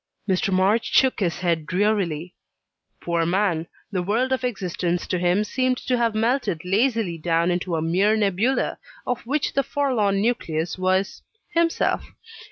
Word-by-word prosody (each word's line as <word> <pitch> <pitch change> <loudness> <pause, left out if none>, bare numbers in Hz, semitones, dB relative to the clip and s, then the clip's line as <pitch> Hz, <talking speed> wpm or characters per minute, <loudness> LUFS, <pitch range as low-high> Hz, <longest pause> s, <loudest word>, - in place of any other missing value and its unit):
Mr. 190 0 +1
March 195 +5 +2
shook 260 -2 +3
his 180 -4 -1
head 165 -4 0
drearily. 180 -4 0 0.7
Poor 170 -1 0
man! 175 -2 0 0.2
the 185 -3 -1
world 225 +8 0
of 260 0 0
existence 180 -6 -2
to 180 - -1
him 180 +4 +2
seemed 255 +3 0
to 255 - -1
have 230 -2 +1
melted 225 - 0
lazily 210 -3 +1
down 170 +2 +1
into 175 0 -1
a 160 - -1
mere 190 +6 +2
nebula, 210 +5 0 0.3
of 245 - -2
which 290 +2 0
the 275 - +3
forlorn 245 -9 0
nucleus 175 -8 -1
was 185 +1 0 0.3
himself. 335 0 +1
195 Hz, 150 wpm, -23 LUFS, 175-235 Hz, 0.7 s, shook